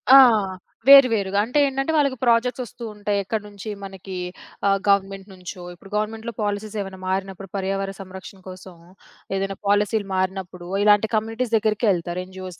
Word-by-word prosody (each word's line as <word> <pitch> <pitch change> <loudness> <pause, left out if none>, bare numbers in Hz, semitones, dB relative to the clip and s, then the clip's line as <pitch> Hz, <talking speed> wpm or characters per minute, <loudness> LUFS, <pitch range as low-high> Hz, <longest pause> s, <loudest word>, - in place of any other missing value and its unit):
ఆ! - - +12 0.7
వేరు 275 -1 +10
వేరుగా. 200 -2 0
అంటే 250 +6 +1
ఏంటంటే 270 +3 -1
వాళ్ళకి 280 -4 +2
ప్రాజెక్ట్స్ 245 +1 +2
వస్తూ 240 0 -11
ఉంటాయి. 205 0 -1
ఎక్కడి 210 +2 -3
నుంచి 205 +1 -9
మనకి 195 -1 -8 0.5
ఆహ్, 195 0 +4
గవర్నమెంట్ 195 0 +1
నుంచో 185 0 -9
ఇప్పుడు 185 +3 -16
గవర్నమెంట్‌లో 220 +2 -2
పాలిసీస్ 205 +1 -3
ఏవన్నా 190 -1 -7
మారినప్పుడు 195 +1 -3
పర్యావరణ 195 0 -2
సంరక్షణ 190 +1 -10
కోసం, 185 0 -10 0.6
ఏదైనా 195 0 -2
పాలిసీలు 205 +1 +2
మారినప్పుడు 185 -1 -3 0.2
ఇలాంటి 210 +1 +5
కమ్యూనిటీస్ 225 +2 -2
దెగ్గరికే 215 +1 +1
యెళ్తారు. 175 -1 -1
ఎన్‌జిఓస్ 185 -1 -9
200 Hz, 150 wpm, -23 LUFS, 190-220 Hz, 0.7 s, ఆ